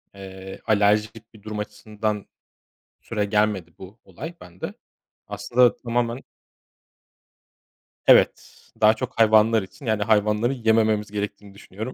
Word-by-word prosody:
eee, 95 0 -10
alerjik 105 +1 +1
bir 110 - -16
durum 105 -1 -5
açısından 105 0 -4 0.8
süregelmedi 105 -5 -1
bu 95 +5 -12
olay 165 +5 -8
bende. 90 0 -8 0.5
Aslında 120 +4 +2
tamamen 120 +1 -2 1.9
Evet, - - +4 0.3
daha 110 +1 +7
çok 125 +2 -6
hayvanlar 110 0 +5
için 120 +8 -13
yani 110 -2 +1
hayvanları 105 +3 +2
yemememiz 110 -3 +1
gerektiğini 105 -1 -5
düşünüyorum. 105 +5 -8
105 Hz, 105 wpm, -23 LUFS, 105-115 Hz, 1.9 s, daha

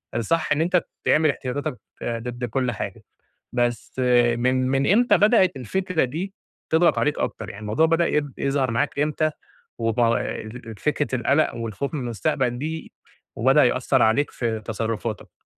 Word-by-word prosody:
الصح 160 +8 0
إن 145 - +3
أنت 175 0 +2 0.2
تعمل 155 0 +4
احتياطاتك 130 -1 -3 0.3
ضد 120 +1 -3
كل 125 +1 -1
حاجة، 105 - -6 0.5
بس 120 0 -1 0.4
من 130 +1 +1
من 135 +5 +2
إمتى 240 +4 +5
بدأت 205 - +4
الفكرة 180 - -1
دي 175 +10 -4 0.4
تضغط 165 +2 +4
عليك 150 0 +1
أكتر؟ 110 - -3
يعني 100 - -9
الموضوع 110 +10 +2
بدأ 165 +1 +2
ي 150 - +2 0.2
يظهر 135 -2 0
معاك 115 +4 -1
إمتى 155 +1 +1 0.5
وب 115 0 0 0.8
فكرة 145 -3 0
القلق 140 +3 +2
والخوف 115 - -4
من 150 - -2
المستقبل 125 +1 -1
دي 160 +3 -5 0.4
وبدأ 135 +5 +5
يأثر 130 +1 +2
عليك 110 +7 +3
في 115 -2 -2
تصرفاتك؟ 110 0 -4
130 Hz, 145 wpm, -23 LUFS, 120-155 Hz, 0.8 s, إمتى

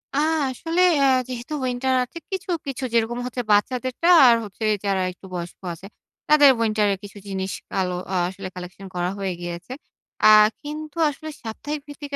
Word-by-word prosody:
আ - - +2 0.3
আসলে 330 +7 -1 0.2
অ্যা 275 - +4 0.2
যেহেতু 250 +3 -6
উইন্টার 255 +1 0
আছে, 250 - -10
কিছু, 380 0 -4 0.2
কিছু 270 -1 -4
যেরকম 235 +1 +1
হচ্ছে 250 0 -3
বাচ্চাদেরটা 255 +9 +1 0.2
আর 235 - +7
হচ্ছে 210 +1 -8 0.2
যারা 195 -1 +1
একটু 180 - -16
বয়স্ক 175 -1 -6
আছে, 185 +4 -11 0.4
তাদের 295 -2 +8
উইন্টারের 215 -3 +1
কিছু 205 0 -10
জিনিস 190 -1 -3 0.2
কালো 185 -2 -1 0.2
আ - - +1
আসলে 190 +1 -7
কালেকশন 180 +2 -9
করা 175 0 0
হয়ে 190 -2 -2
গিয়েছে। 175 +6 -6 0.5
আ - - +10 0.4
কিন্তু 305 +1 -7
আসলে 310 +2 -8
সাপ্তাহিক 290 +7 -5
ভিত্তিতে, 290 0 -7
235 Hz, 165 wpm, -23 LUFS, 195-280 Hz, 0.5 s, আ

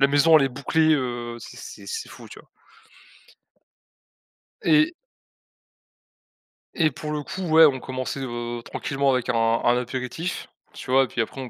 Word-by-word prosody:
la 140 - +6
maison 145 +3 +5
elle 135 - +3
est - - +1
bouclée, 160 +5 +1
heu, 120 -3 -3
c'est - - -11
c'est - - -10
c'est 450 -1 -5
fou, - - -12
tu - - -12
vois? - - -26 2.2
Et 310 +2 +4 1.8
et 160 -3 +2
pour 150 +4 -6
le 150 -1 -3
coup 190 - -6
ouais, 160 +1 +8
on 135 -3 +2
commençait, 130 +1 -5
heu, 120 -2 -4
tranquillement 140 0 -1
avec 125 -2 -1
un - - +1
un 115 +1 +2
apéritif, 130 +8 -4 0.3
tu 130 - -7
vois? 135 +1 +5
Et - - -9
puis 120 - -2
après 130 +4 -5
on 125 - -7
135 Hz, 165 wpm, -24 LUFS, 125-155 Hz, 2.2 s, ouais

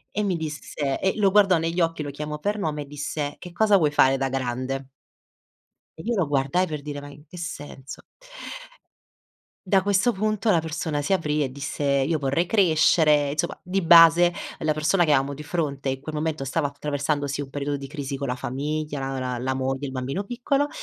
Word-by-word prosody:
e 210 - +1
mi 195 -3 0
disse 145 -3 -3
e 190 - +1
lo 200 -2 +3
guardò 195 -3 +5
negli 165 +2 -1
occhi, 165 -2 0
lo 145 - -5
chiamò 150 +1 -5
per 205 +4 -1
nome 150 -4 -2
e - - -15
disse: 145 0 -4
"Che 180 - -9
cosa 210 +1 +4
vuoi 150 -4 +2
fare 135 -2 +4
da 135 0 -1
grande?" 130 +1 -3 1.1
E - - -7
io 240 - -1
lo 180 -7 +1
guardai 145 +6 +1
per 150 -2 -5
dire: 145 -1 -5
"Ma 145 - -9
in 145 +1 -15
che 175 +4 -13
senso?" 145 -5 -7 1.7
Da 190 -1 +5
questo 205 +4 +2
punto 215 +2 0
la 170 -5 +4
persona 160 -2 -2
si 145 - -3
aprì 150 -5 +1
e 130 - -3
disse: 140 +2 -5
"Io 140 +3 +2
vorrei 140 +5 +1
crescere", 155 -6 +4
insomma, 150 - -2
di 190 +2 -1
base 170 +1 +7 0.3
la 155 0 +1
persona 155 +5 +2
che 155 - +2
amo 140 0 +2
di 150 +2 -8
fronte 145 -4 -2
in 130 0 -2
quel 155 +2 -7
momento 150 -2 -2
stava 145 +2 0
attraversando, 145 0 -2
sì, 140 +1 -3
un 140 - -7
periodo 145 +1 -2
di 140 -1 -6
crisi 140 -2 -5
con 140 -1 -4
la 125 - -1
famiglia, 145 +3 -3
la 135 0 -3
la 125 -1 -3
la 130 +1 -1
moglie, 135 +1 -2
il - - -6
bambino 135 +9 -3
piccolo, 260 +6 0
150 Hz, 205 wpm, -24 LUFS, 140-170 Hz, 1.7 s, base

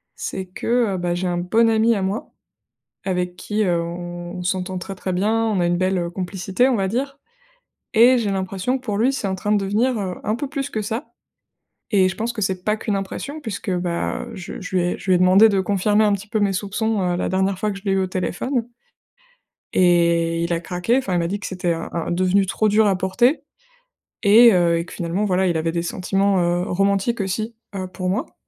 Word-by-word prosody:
C'est 190 - -4
que, 225 +3 0
heu, - - -2
bah, 175 0 -1
j'ai 180 +1 -2
un 175 0 -1
bon 225 +6 +3
ami 225 +1 +3
à 195 - -1
moi 195 +4 -3 0.7
avec 180 -2 -1
qui, 210 +3 -1
heu, 175 -2 +1
on 175 +1 -6 0.2
on - - -5
s'entend 185 0 -2
très, 195 +2 -6
très 185 0 -4
bien, 195 +4 +1 0.2
on 210 -4 0
a 175 - +2
une 175 0 +1
belle, 185 +1 +1
heu, 170 -1 -2
complicité, 190 +6 0
on 255 - +2
va 195 - 0
dire 275 +6 -3 0.8
et 245 +3 +6
j'ai 215 -4 -1
l'impression 195 +5 -1
que 255 - -21
pour 205 -4 -2
lui, 250 +5 +3
c'est 245 -7 -3
en 190 - -1
train 205 +3 -1
de 210 - +4
devenir, 230 +6 +1
heu, 185 -3 -3
un 215 - 0
peu 270 +4 -4
plus 275 -1 -4
que 215 - -2
ça 225 +7 -5 0.8
et 195 -3 +4
je 185 - -5
pense 235 +2 -2
que 215 - -5
c'est 185 -2 -1
pas 210 - +1
qu'une 210 -2 -2
impression 195 +10 -5
puisque, 220 -6 -5
bah, 175 -1 -2
heu, 230 - -9
je 180 -2 -7
je 190 0 -5
lui 180 - +3
ai 175 - -1
je - - -12
lui 185 - +6
ai - - +4
demandé 190 +4 +7
de 195 - +1
confirmer 205 +3 +2
un 205 - +3
petit 200 +1 -4
peu 220 - 0
mes 200 -2 +1
soupçons, 210 +2 -1
heu, 180 -1 0
la - - -1
dernière 190 0 0
fois 210 +1 0
que 195 - -6
je 195 - -13
l'ai 195 - +1
eu 195 - +2
au 190 - 0
téléphone 190 +8 -2 1.1
et 170 -2 +3
il 170 - -2
a 165 - 0
craqué, 180 +9 0
enfin 195 -8 -2
il - - +2
m'a 170 -1 0
dit 200 +3 -3
que - - -5
c'était 180 -2 -1
un 165 0 -4
un 165 -1 -3
devenu 185 +3 +2
trop 215 +3 +1
dur 215 +1 +4
à 195 -2 +2
porter 240 - +2 0.8
et 225 +3 +7
heu 170 -2 +3
et 170 - -3
que - - -13
finalement, 175 +4 -2
voilà, 190 -1 +1
il 175 -2 +1
avait 165 +1 -1
des 170 0 -1
sentiments, 195 +2 0
heu, 175 +1 +1
romantiques 200 +4 +1
aussi, 215 +4 -3 0.2
heu, 185 -1 -4
pour 185 0 -4
moi. 190 +4 -2
190 Hz, 240 wpm, -21 LUFS, 180-215 Hz, 1.1 s, demandé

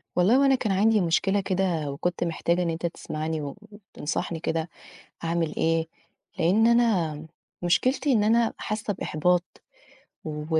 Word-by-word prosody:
والله 180 +7 +4
هو 275 - +4
أنا 270 -1 +5
كان 220 -5 -1
عَندي 210 +2 +3
مشكلة 195 +4 +1
كده 180 -6 -1
وكُنت 175 +6 -2
محتاجة 170 +1 0
إن 170 - -1
أنت 165 +1 -3
تسمعني 160 -2 -3
و 145 +3 -6
وتنصحني 175 -5 -5
كده، 160 0 -2 0.5
أعمل 165 -1 -1
إيه، 165 0 +1 0.5
لإن 190 +7 +4
أنا، 185 -11 +2 0.4
مشكلتي 255 - +2
إن 220 -5 +3
أنا 230 +2 +3
حاسّة 210 0 -3
بإحباط، 175 0 +1 0.8
و 150 -1 -5
175 Hz, 140 wpm, -26 LUFS, 160-210 Hz, 0.8 s, أنا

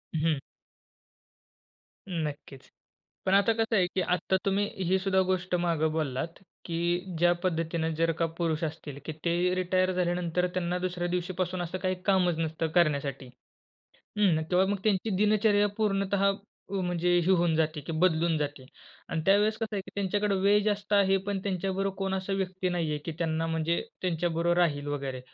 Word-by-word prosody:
हं. 155 -2 +1 1.7
नक्कीच. 150 -6 -5 0.6
पण 190 - +2
आता 200 +3 +5
कसं 225 0 0
आहे 185 -3 +3
की 190 - +2
आता 180 +1 +1
तुम्ही 200 +1 +2 0.2
ही 185 +2 +3
सुद्धा 190 0 +1
गोष्ट 180 -1 -1
मागे 170 -3 +1
बोललात, 145 -2 -1 0.4
की 175 +1 -1
ज्या 175 +1 +5
पद्धतीने 165 -2 0
जर 165 +1 +2
का 165 - +3
पुरुष 165 -1 -1
असतील 150 -3 -5
की 155 - -3
ते 170 - +2 0.2
रिटायर 185 0 +1
झाल्यानंतर 180 0 0
त्यांना 180 -1 -1
दुसऱ्या 180 -1 -2
दिवशीपासून 180 0 -2
असं 175 +2 -3
काही 185 0 -1
कामच 180 -4 +3
नसतं 160 0 -1
करण्यासाठी 140 -5 +1 0.9
हं. 180 -7 +3
तेव्हा 185 +1 +4
मग 200 +1 -1
त्यांची 215 0 +1
दिनचर्या 210 0 +3
पूर्णतः 200 -2 +2 0.4
व, 195 -1 -1
म्हणजे 175 0 +1
हे 185 - +2
होऊन 175 -3 +3
जाते 155 -1 0
की 165 - -3
बदलून 165 0 +2
जाते. 145 -2 -4 0.4
आणि 165 - -1
त्यावेळेस 205 +2 +4
कसं 225 -2 -3
आहे - - -1
की - - -13
त्यांच्याकडे 200 +1 0
वेळ 205 +2 +4
जास्त 210 -1 -1
आहे 195 -1 +4
पण 200 -1 -1
त्यांच्याबरोबर 195 0 -1
कोण 195 0 -1
असा 190 +1 -3
व्यक्ती 185 -1 -1
नाहीये, 165 -4 -1
की 160 +2 -6
त्यांना 165 -1 0
म्हणजे 165 +1 0 0.2
त्यांच्याबरोबर 170 -1 0
राहील 145 -5 +1
वगैरे. 135 -3 -3
180 Hz, 160 wpm, -28 LUFS, 165-195 Hz, 1.7 s, आता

